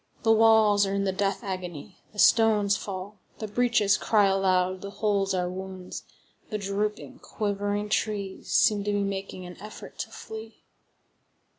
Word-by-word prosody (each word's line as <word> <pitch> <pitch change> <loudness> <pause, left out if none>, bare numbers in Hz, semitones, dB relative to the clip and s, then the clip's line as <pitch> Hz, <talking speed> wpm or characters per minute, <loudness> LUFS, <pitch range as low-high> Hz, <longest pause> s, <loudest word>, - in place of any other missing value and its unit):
The 225 - +4
walls 220 -2 +5
are 195 - -1
in 200 - 0
the 195 - +1
death 195 +1 -1
agony, 185 -1 -6
the 210 - -18
stones 210 -2 +4
fall; 195 +1 -6 0.2
the 215 - -5
breaches 215 -2 +2
cry 210 -2 +3
aloud; 185 -1 +1
the 200 - -6
holes 200 -2 0
are 180 -1 0
wounds; 185 0 -7 0.4
the 215 - -2
drooping, 210 +5 -3
quivering 205 -1 -2
trees 205 -2 -2
seem 210 -3 +4
to 205 - 0
be 205 0 +1
making 195 -2 -4
an 180 0 -11
effort 215 +1 -10
to - - -4
flee. 220 0 -10
200 Hz, 155 wpm, -27 LUFS, 190-215 Hz, 0.4 s, walls